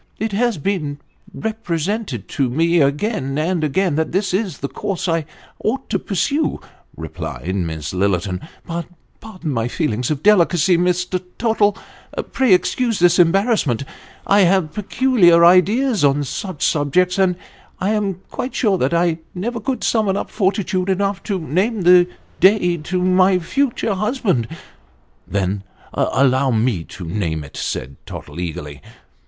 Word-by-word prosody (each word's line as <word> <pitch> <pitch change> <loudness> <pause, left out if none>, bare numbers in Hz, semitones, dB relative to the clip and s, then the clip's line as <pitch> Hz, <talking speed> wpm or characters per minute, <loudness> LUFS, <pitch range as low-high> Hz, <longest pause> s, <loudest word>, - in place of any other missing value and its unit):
" - - -38
It 220 0 -2
has 230 0 +1
been 150 -3 -2 0.3
represented 200 - -3
to 135 -3 0
me 165 +5 +2
again 140 - 0
and 165 +1 0
again 155 +2 +1
that 160 -1 0
this 190 0 0
is 190 -6 -1
the 140 - -4
course 190 +6 -4
I 165 -2 0 0.4
ought 265 +5 -2
to - - +1
pursue," 280 - -1 0.4
replied 90 +3 -5
Miss 80 -4 -3
Lillerton, 95 -1 0
" - - -30
but 170 0 -4 0.3
pardon 185 -8 -6
my 115 -1 0
feelings 125 -4 -1
of 150 -2 -2
delicacy, 180 -4 +4
Mr. 180 +1 0 0.2
Tottle 220 -3 +2 0.5
pray 260 -5 +2
excuse 225 +5 +2
this 175 0 +4
embarrassment 175 - +2 0.4
I 200 - +4
have 185 -4 +3
peculiar 205 -6 +4
ideas 205 - +4
on 145 +1 +3
such 170 +4 -4
subjects, 180 +6 +1
and 185 -2 +3 0.4
I 195 +3 0
am 200 -4 -1
quite 255 - -4
sure 200 -6 +2
that 135 +6 +1
I 170 -1 +1 0.2
never 230 +6 -3
could 255 +1 -3
summon 210 -4 +1
up - - -4
fortitude 190 -2 0
enough 195 0 0
to 200 - -1
name 185 - -1
the 180 0 +6 0.3
day 185 -3 +4
to 180 +3 -2
my 185 +1 +4
future 230 +4 -1
husband." 200 - 0 0.4
" - - -38
Then 100 0 -1 0.3
allow 135 0 +2
me 110 -7 0
to 90 -1 -9
name 80 -3 -2
it," 70 - -13
said 70 +2 -4
Tottle 75 +3 -8
eagerly. 75 -5 -6
180 Hz, 150 wpm, -19 LUFS, 140-205 Hz, 0.5 s, the